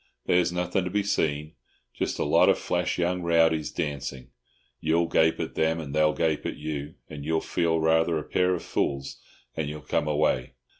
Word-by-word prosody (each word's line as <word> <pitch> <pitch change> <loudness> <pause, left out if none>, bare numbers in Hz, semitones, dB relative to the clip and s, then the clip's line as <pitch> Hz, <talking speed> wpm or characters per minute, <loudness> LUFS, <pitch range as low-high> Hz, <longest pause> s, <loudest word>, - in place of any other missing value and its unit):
"There's 90 0 +3
nothing 90 +1 -1
to - - -2
be 100 +2 0
seen—just 75 -5 -3
a - - 0
lot - - +4
of - - +4
flash - - -1
young 90 +1 0
rowdies 80 -2 +2
dancing. 70 -4 -4 0.5
You'll 80 +3 +2
gape 80 -1 +2
at - - -3
them, 80 +1 +1
and 70 -3 -6
they'll 75 0 +3
gape 80 -2 0
at - - -5
you, 75 0 -5
and 75 -2 -8
you'll 80 +2 +1
feel 85 -1 0
rather 80 +1 +3
a 75 - -3
pair 90 0 +1
of 85 - -6
fools, 70 -1 -2 0.3
and 75 -2 -2
you'll 75 0 -7
come 70 +3 -1
away. 75 -5 +1
80 Hz, 185 wpm, -26 LUFS, 75-85 Hz, 0.5 s, lot